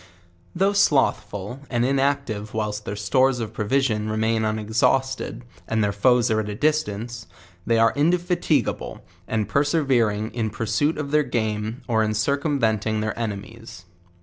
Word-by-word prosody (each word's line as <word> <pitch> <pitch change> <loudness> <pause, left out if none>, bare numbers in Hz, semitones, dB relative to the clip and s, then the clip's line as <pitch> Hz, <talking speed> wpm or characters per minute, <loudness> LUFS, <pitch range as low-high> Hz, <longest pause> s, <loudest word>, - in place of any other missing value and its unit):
Though 195 +3 +2
slothful 135 - +1
and 120 -1 +1
inactive 135 -6 -1
whilst 105 -1 -2
their 100 - -4
stores 130 +5 +2
of 110 -2 -4
provis 135 +6 +1
ion 105 0 -2
remain 110 +1 0
unexausted, 110 +5 0 0.2
and 110 -1 +1
their 100 - +1
foes 120 +3 +3
are 110 - +2
at 105 -1 -3
a 105 - -4
distance, 120 - -1 0.4
they 115 - +3
are 115 0 +4
indefatigable 170 -2 0 0.2
and 110 -2 -1
persevering* 130 -8 +1
in 115 -2 -1
pursuit 115 +9 0
of 145 -2 -4
their 150 0 +4
ganK 110 -1 -2
,;r 115 -3 +2
in 110 0 0
circumventing 110 -4 0
their 110 0 -2
enemies. 110 -2 -6
115 Hz, 145 wpm, -23 LUFS, 110-135 Hz, 0.4 s, are